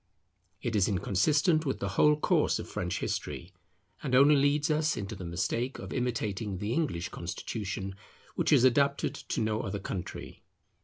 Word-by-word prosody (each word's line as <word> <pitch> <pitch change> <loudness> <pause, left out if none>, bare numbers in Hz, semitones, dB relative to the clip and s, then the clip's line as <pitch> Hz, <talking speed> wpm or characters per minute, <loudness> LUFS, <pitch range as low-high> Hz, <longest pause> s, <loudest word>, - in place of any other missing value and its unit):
It 120 -3 -1
is 100 -3 +3
inconsistent 145 - +2
with 135 -4 -1
the 100 - -3
whole 150 +9 +4
course 150 - +2
of - - -6
French - - -3
history; 90 +2 -4 0.5
and 130 -3 0
only 140 +3 +7
leads 145 +2 +2
us 155 0 +1
into 100 +1 -4
the 95 - -8
mistake 115 +9 -2
of - - -7
imitating 110 -5 -2
the 105 +5 -2
English 125 - -1
constitution, 95 +2 -5 0.4
which - - 0
is - - +6
adapted 140 +2 +3
to - - -4
no 110 0 0
other 100 -1 -3
country. 95 -2 -6
115 Hz, 160 wpm, -30 LUFS, 100-140 Hz, 0.5 s, only